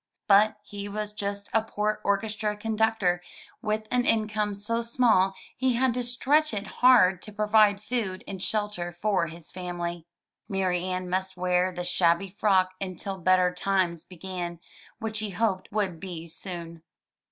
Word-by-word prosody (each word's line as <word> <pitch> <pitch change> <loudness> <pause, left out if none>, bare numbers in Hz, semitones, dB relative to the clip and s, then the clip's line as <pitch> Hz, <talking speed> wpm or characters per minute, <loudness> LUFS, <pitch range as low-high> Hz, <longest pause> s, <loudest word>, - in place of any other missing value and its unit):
But 210 +1 +5
he 205 0 -7
was 210 0 -4
just 200 -1 -3
a 225 - +4
poor 215 -1 -2
orchestra 210 +1 0
conductor 220 -4 +1 0.4
with 215 0 -2
an 250 0 +3
income 215 -2 +1
so 230 +4 -2
small 230 -5 +3 0.2
he 260 0 +1
had 250 +1 +2
to 250 +1 -2
stretch 270 +3 +2
it 200 0 -3 0.2
hard 190 -8 +6
to 215 - -9
provide 210 -1 +4
food 210 -4 -3
and 190 -2 -6
shelter 205 -5 -1
for 175 0 0
his 165 0 -10
family. 175 -2 -5 0.4
Marianne 185 -1 -1
must 190 +1 -2
wear 180 0 +2
the 180 0 -5
shabby 175 +1 +2
frock 190 -2 +2
until 190 0 -4
better 185 0 +3
times 180 -3 0
began, 180 -1 -6 0.4
which 220 -2 -3
he 215 -1 -2
hoped 195 -1 -1
would 195 -5 -1
be 175 -3 -6
soon. 170 -1 -6
200 Hz, 150 wpm, -27 LUFS, 180-215 Hz, 0.4 s, hard